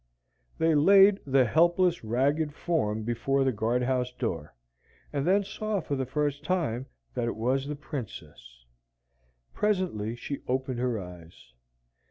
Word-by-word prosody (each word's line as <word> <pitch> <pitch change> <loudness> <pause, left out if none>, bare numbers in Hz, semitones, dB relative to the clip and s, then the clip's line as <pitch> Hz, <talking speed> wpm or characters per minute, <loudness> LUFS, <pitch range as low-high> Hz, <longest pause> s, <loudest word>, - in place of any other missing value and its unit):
They 160 0 +3
laid 195 +6 +6
the 135 -1 +4
helpless, 175 +5 +3
ragged 145 +7 0
form 110 -11 -1
before 120 +4 0
the 135 - +2
guard 115 +3 0
house 125 0 0
door, 85 - -4 0.6
and 140 +2 -1
then 200 +2 +4
saw 210 +1 -3
for 145 -4 -3
the 130 -2 -2
first 145 +1 -1
time 145 -8 -1 0.3
that 120 -2 -1
it - - -2
was 130 +5 0
the 150 - -3
Princess. 60 - -9 0.9
Presently 180 - -1
she 140 +4 -6
opened 130 -1 -1
her 125 -3 0
eyes. 85 -8 -12
135 Hz, 140 wpm, -28 LUFS, 115-160 Hz, 0.9 s, laid